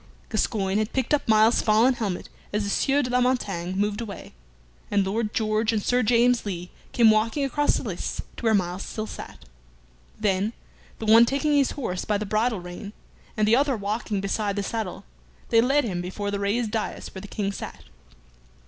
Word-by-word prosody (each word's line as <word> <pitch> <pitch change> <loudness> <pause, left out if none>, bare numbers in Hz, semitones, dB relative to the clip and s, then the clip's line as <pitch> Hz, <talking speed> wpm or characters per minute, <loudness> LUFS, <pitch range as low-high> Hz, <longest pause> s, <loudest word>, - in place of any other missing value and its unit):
Gascoyne 205 -2 0
had 215 +1 -2
picked 260 +1 0
up 295 - +1
Myles's 220 +1 +5
fallen 225 +4 +4
helmet 210 -7 -3 0.2
as 210 0 0
the 200 - -2
Sieur 280 +5 +2
de 250 - -3
la 250 0 +3
Montaigne 195 -9 0
moved 205 +2 0
away, 210 -4 -8 0.6
and 200 -1 +2
Lord 210 +2 -1
George 215 -1 +1
and 215 -3 -1
Sir 250 0 +2
James 245 +1 +3
Lee 180 -3 -5 0.2
came 230 -2 +6
walking 225 +6 +1
across 290 +2 +1
the - - -5
lists - - -4 0.2
to - - -10
where 225 -2 +4
Myles 180 -1 -1
still 215 +1 -4
sat. - - -9 0.7
Then, 205 +1 +1 0.4
the 220 - -6
one 225 +2 +7
taking 290 +3 +1
his 280 -2 +3
horse 185 -10 -3
by 210 - 0
the 215 - -3
bridle 215 +1 0
rein, 180 +4 -8 0.4
and 215 0 +2
the 225 - +5
other 275 -1 +2
walking 205 0 -2
beside 200 +1 -1
the 205 - -1
saddle, 215 -3 -4 0.5
they 230 - +5
led 275 +4 +3
him 185 -7 -2
before 200 +3 -4
the 200 - -2
raised 210 +3 0
dais 220 -1 -4
where 190 - -7
the 205 - -9
King 200 -1 -2
sat. - - -8
215 Hz, 195 wpm, -25 LUFS, 200-240 Hz, 0.7 s, one